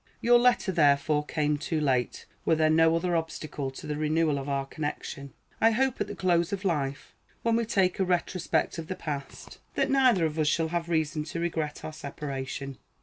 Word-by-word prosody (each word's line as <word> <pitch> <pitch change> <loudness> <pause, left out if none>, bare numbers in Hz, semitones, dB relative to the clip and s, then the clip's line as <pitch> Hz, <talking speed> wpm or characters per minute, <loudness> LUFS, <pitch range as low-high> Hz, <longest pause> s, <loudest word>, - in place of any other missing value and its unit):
Your 240 +1 +5
letter, 240 -5 +3
therefore, 150 -2 +3
came 150 -1 0
too 160 +1 -2
late, 130 -5 0 0.2
were 165 - +3
there 155 0 +3
no 165 +1 +5
other 175 +1 0
obstacle 155 -4 -3
to 130 - -10
the 150 - -3
renewal 155 -1 +1
of 135 +1 -5
our 140 -1 -1
connection. 140 -1 -5 0.3
I 225 - +7
hope 260 +3 0
at - - 0
the - - -6
close 175 -2 +1
of 200 0 -4
life, 140 -6 -2 0.3
when 230 0 +2
we 230 0 +1
take 190 -4 +1
a - - +3
retrospect 175 -2 0
of 160 - -6
the 185 - -3
past, 145 -5 -7 0.2
that - - +1
neither 255 -10 +4
of 160 0 -2
us 155 - +2
shall 160 +1 +1
have 170 0 -2
reason 155 -2 0
to 170 - -5
regret 160 -3 -3
our 155 - -6
separation. 140 -2 -6
160 Hz, 200 wpm, -28 LUFS, 145-180 Hz, 0.3 s, I